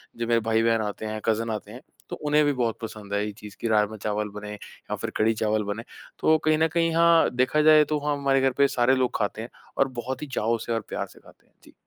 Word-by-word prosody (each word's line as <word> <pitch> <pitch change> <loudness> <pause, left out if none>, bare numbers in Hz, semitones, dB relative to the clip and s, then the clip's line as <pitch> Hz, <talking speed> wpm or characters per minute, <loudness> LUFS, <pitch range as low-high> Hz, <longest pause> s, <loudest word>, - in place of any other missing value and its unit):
जो 115 0 -3
मेरे 115 0 +3
भाई 110 0 +1
बहन 115 -1 +2
आते 105 +1 -4
हैं, 110 0 -4
कज़िन 115 +1 0
आते 105 -1 -5
हैं, 125 +4 -10 0.3
तो - - -4
उन्हें 150 0 +2
भी 145 - +2
बहुत 120 -3 -1
पसंद 105 -2 -7
है 100 +1 0
ये 105 - -4
चीज़, 105 -1 -12
कि - - -2
राजमा-चावल 105 -1 0
बने 105 0 -8
या 105 - -8
फिर - - -4
कढ़ी-चावल 110 -1 +1
बने। 105 +2 -4 0.4
तो 160 0 +4
कहीं 155 0 +4
न 160 +1 +3
कहीं 165 -1 +2
हाँ, 170 0 +5
देखा 130 +5 +2
जाए 155 0 +7
तो 150 0 -1
हाँ, 150 -1 +1
हमारे 135 -1 +2
घर 135 0 +3
पे 140 0 +5
सारे 130 0 +2
लोग 130 -1 0
खाते 105 +1 -2
हैं 115 - -7 0.3
और 135 - +3
बहुत 130 +2 -5
ही 150 - -5
चाव 115 -3 0
से 120 - -2
और 115 - -1
प्यार - - -3
से - - -18
खाते - - -21
हैं। - - -36
जी। - - -18
115 Hz, 260 wpm, -25 LUFS, 110-140 Hz, 0.4 s, जाए